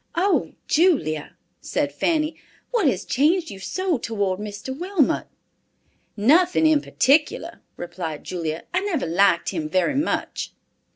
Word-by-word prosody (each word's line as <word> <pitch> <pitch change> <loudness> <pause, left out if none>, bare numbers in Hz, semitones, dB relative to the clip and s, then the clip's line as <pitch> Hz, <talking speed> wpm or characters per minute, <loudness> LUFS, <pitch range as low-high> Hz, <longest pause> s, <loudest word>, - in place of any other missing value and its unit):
"Oh, 375 +3 +1
Julia," 285 - +1 0.2
said 140 0 -2
Fanny, 310 - 0 0.4
"what 460 -10 +2
has 200 -7 0
changed 325 +6 +2
you 195 - -9
so 365 - -1
toward 200 -5 -1
Mr. 210 +5 -6
Wilmot?" 350 -2 0 0.9
"Nothing 320 - +4
in 310 -2 +4
particular," 300 +5 +1 0.2
replied 170 -3 -6
Julia. 165 -3 -4
"I 360 - +3
never 385 - -1
liked 170 +1 +3
him 160 -5 -3
very 185 - +1
much." 290 +4 -2
270 Hz, 125 wpm, -23 LUFS, -, 0.9 s, Nothing